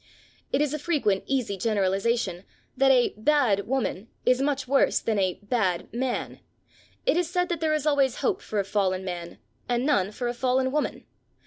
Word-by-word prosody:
It 270 - +2
is 300 -1 0
a 305 - -2
frequent 280 - 0
easy 255 -7 0
generalisation 195 -1 0 0.3
that 270 0 +4
a 255 -2 +4
"bad" 220 -5 +2
woman 235 -5 -2 0.2
is 250 +1 +3
much 275 -2 -1
worse 275 +1 +3
than 220 -2 -1
a 185 -2 +1
"bad" 205 -6 -1
man. 250 +1 -2 0.7
It 425 - +3
is 350 -2 0
said 360 0 0
that 340 -2 -1
there 310 -1 +1
is 305 -1 -2
always 280 -4 +2
hope 400 -5 -1
for 215 - -3
a 200 - 0
fallen 190 -2 0
man 175 -2 -6 0.3
and 245 +1 +1
none 205 -11 +2
for 240 +3 -4
a 240 - -1
fallen 260 +1 +1
woman. 300 +1 -2
250 Hz, 185 wpm, -26 LUFS, 200-285 Hz, 0.7 s, that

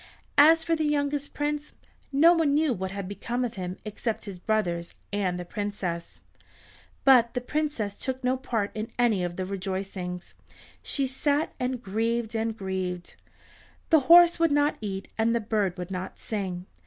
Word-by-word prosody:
As 320 +2 +7
for 330 0 +1
the 315 - -1
youngest 285 -1 -1
Prince 295 0 -2 0.4
no 315 +5 +6
one 315 -4 +2
knew 305 -3 +3
what 190 -2 -3
had 195 0 -5
become 240 +5 -2
of 235 - -4
him 185 -1 -5
except 215 +1 -3
his 195 -3 -7
brothers 175 -5 -1 0.2
and 185 -3 0
the 175 - -5
Princess. 185 -4 -4 0.8
But 250 -3 +6
the - - +1
Princess 250 -7 -2
took 260 +2 -4
no 250 +1 +2
part 230 -6 -2
in 215 +1 -4
any 230 -6 +2
of 175 0 -3
the 185 - -3
rejoicings. 190 -1 -4 0.5
She 275 - 0
sat 285 +3 0
and 250 -1 -2
grieved 225 +3 -1
and 225 0 -1
grieved. 185 -2 -4 0.8
The 320 - +8
horse 345 0 +8
would 330 -2 +3
not 290 +1 +2
eat 195 -2 -4
and 230 +1 +3
the - - +2
bird 210 -4 -1
would 180 +1 -6
not 185 0 -5
sing. 185 -4 -4
220 Hz, 165 wpm, -27 LUFS, 190-280 Hz, 0.8 s, The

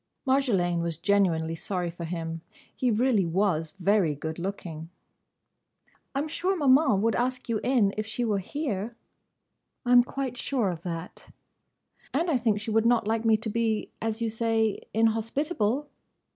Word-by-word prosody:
Marjolaine 205 -11 +2
was 170 -2 -2
genuinely 170 -5 +2
sorry 175 +1 -3
for 170 0 -7
him. 165 -1 -4 0.3
He 255 - +1
really 230 -2 +3
was 165 -3 +1
very 185 -5 +2
good 160 +3 -5
looking. 170 -4 -5 1.3
"I'm 285 +3 0
sure 370 +5 -1
Maman 265 - +4
would 230 0 +2
ask 250 +2 -1
you 230 -2 0
in, 235 -6 +3
if 215 0 -2
she 240 +2 -2
were 210 -3 +1
here." 230 - -4 0.9
"I 245 - +1
'm 245 0 +8
quite 255 -1 -4
sure 240 -6 0
of 165 -2 -7
that." 170 0 -7 0.8
"And 335 +4 +1
I 275 - +3
think 225 -4 +1
she 215 +1 -4
would 220 0 +3
not 235 -3 +3
like 225 +1 0
me 220 -1 +5
to 220 +1 -4
be—as 225 0 -1
you 225 - -1
say—inhospitable." 225 - 0
220 Hz, 150 wpm, -27 LUFS, 180-245 Hz, 1.3 s, m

